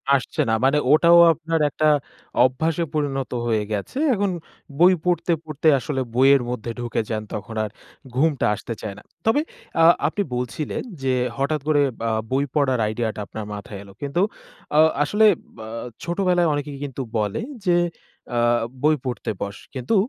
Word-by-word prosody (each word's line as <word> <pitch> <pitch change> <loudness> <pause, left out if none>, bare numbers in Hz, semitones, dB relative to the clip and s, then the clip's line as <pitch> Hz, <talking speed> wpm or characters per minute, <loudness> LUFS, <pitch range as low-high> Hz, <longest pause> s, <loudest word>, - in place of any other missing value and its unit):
আসছে 140 +4 -1
না 110 - +2
মানে 135 +2 +4
ওটাও 170 +3 +7
আপনার 165 +1 -2
একটা 155 +2 +1 0.6
অভ্যাসে 160 +6 +1
পরিণত 140 -4 -1 0.2
হয়ে 110 -2 +1
গেছে। 105 - -4 0.2
এখন 205 -2 0 0.5
বই 180 +2 +7
পড়তে, 175 0 +1
পড়তে 155 0 -2
আসলে 135 +2 -2
বইয়ের 135 +1 +6
মধ্যে 120 -1 -4
ঢুকে 120 -2 -1
যান, 110 -1 -2
তখন 105 +2 -6
আর 110 - -3 0.5
ঘুমটা 145 0 +2
আসতে 115 - -6
চায় 100 -2 -5
না। 105 - -13 0.2
তবে 225 +7 +3 0.4
আ - - +6 0.2
আপনি 185 +6 -2
বলছিলেন 125 +5 -3 0.2
যে 130 - +2 0.2
হঠাৎ 140 +2 0
করে 150 -2 +4 0.3
আ - - 0 0.2
বই 135 +2 +2
পড়ার 135 -4 +2
আইডিয়াটা 110 0 -2
আপনার 110 -1 -6
মাথায় 100 0 -7
এলো। 100 -1 -14
কিন্তু 145 +5 -1 0.6
আ - - +7 0.2
আসলে 210 +9 +3 0.3
বা 110 - -8 0.4
ছোটবেলায় 175 -1 +1
অনেকে 145 0 -3
কিন্তু 135 -2 -5 0.2
বলে 105 -2 -1 0.2
যে, 175 -1 +4 0.6
আ - - +1 0.5
বই 155 +1 +5
পড়তে 125 -5 -3
বস, 100 0 -4 0.2
কিন্তু 130 - -1
140 Hz, 160 wpm, -23 LUFS, 115-160 Hz, 0.6 s, ওটাও